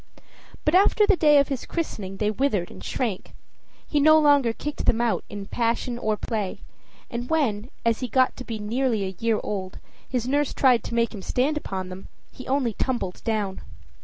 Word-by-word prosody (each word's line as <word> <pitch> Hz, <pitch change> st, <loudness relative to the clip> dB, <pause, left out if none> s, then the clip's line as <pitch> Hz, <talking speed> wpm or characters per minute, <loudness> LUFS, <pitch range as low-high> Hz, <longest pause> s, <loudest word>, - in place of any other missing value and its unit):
But 305 Hz, -, +2 dB
after 405 Hz, +3 st, +5 dB
the 405 Hz, -, +4 dB
day 300 Hz, -3 st, +5 dB
of 280 Hz, 0 st, +4 dB
his 270 Hz, -3 st, -4 dB
christening 200 Hz, -, -4 dB
they 210 Hz, +1 st, +1 dB
withered 215 Hz, -7 st, 0 dB
and -, -, -11 dB
shrank; 220 Hz, -7 st, -3 dB, 0.5 s
he 295 Hz, -, +1 dB
no 310 Hz, +2 st, +7 dB
longer 285 Hz, -5 st, +4 dB
kicked 295 Hz, +6 st, -5 dB
them 230 Hz, -, +3 dB
out 235 Hz, -2 st, +1 dB
either 205 Hz, -, -6 dB
in -, -, -7 dB
passion 235 Hz, +2 st, -1 dB
or 215 Hz, -2 st, 0 dB
play, 210 Hz, -5 st, -3 dB, 0.5 s
and 240 Hz, +1 st, -4 dB
when, 250 Hz, -8 st, 0 dB, 0.2 s
as 230 Hz, -1 st, +2 dB
he 255 Hz, -, -2 dB
got 255 Hz, +3 st, +2 dB
to 255 Hz, -, -6 dB
be 230 Hz, -3 st, -5 dB
nearly 225 Hz, +1 st, 0 dB
a 190 Hz, 0 st, -5 dB
year 225 Hz, -2 st, +1 dB
old, 190 Hz, -2 st, -4 dB, 0.3 s
his 245 Hz, -2 st, -1 dB
nurse 285 Hz, +1 st, 0 dB
tried 250 Hz, -3 st, +4 dB
to 235 Hz, -, -4 dB
make 235 Hz, 0 st, +1 dB
him 205 Hz, -, -7 dB
stand 260 Hz, +10 st, 0 dB
upon 190 Hz, -10 st, -4 dB
them, 185 Hz, +1 st, -9 dB, 0.2 s
he 255 Hz, -, -11 dB
only 260 Hz, -4 st, +1 dB
tumbled 220 Hz, -6 st, -2 dB
down. 210 Hz, -4 st, -2 dB
235 Hz, 195 wpm, -25 LUFS, 210-275 Hz, 0.5 s, no